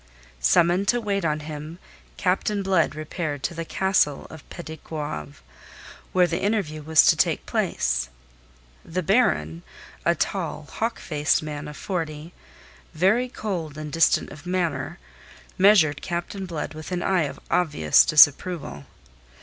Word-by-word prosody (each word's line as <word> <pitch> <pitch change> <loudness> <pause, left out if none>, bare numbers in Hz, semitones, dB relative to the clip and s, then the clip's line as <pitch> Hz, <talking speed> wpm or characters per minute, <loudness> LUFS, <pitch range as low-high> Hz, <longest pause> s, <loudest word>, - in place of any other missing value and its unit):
Summoned 170 - +3
to 240 +3 +3
wait 200 -3 -2
on 155 -1 0
him, 150 +2 -7 0.4
Captain 195 +2 0
Blood 185 -5 +1
repaired 155 -2 -4
to 175 - -2
the 165 0 -4
Castle 190 -5 +1
of 160 - -10
Petit 160 -2 -8
Goave, 75 - -6 0.7
where 180 -1 +4
the 170 -1 -2
interview 195 -8 -1
was 155 +1 +5
to - - +6
take - - +1
place. - - -1 0.7
The 180 +2 -3
Baron, 85 - +1 0.4
a - - +2
tall, - - -3
hawk - - -2
faced 150 +1 0
man 150 -1 -6
of 150 - -9
forty, 165 -3 -4 0.6
very 215 +10 +2
cold 170 - -5
and 155 -1 -6
distant 165 -1 +3
of 150 +4 -12
manner, 170 -4 -2 0.6
measured 185 -7 +5
Captain 180 +2 -4
Blood 160 -4 -5
with 155 +3 -9
an 180 -1 -2
eye 185 -5 +2
of - - -7
obvious 80 - +4
disapproval. 145 - +3
160 Hz, 140 wpm, -24 LUFS, 150-185 Hz, 0.7 s, to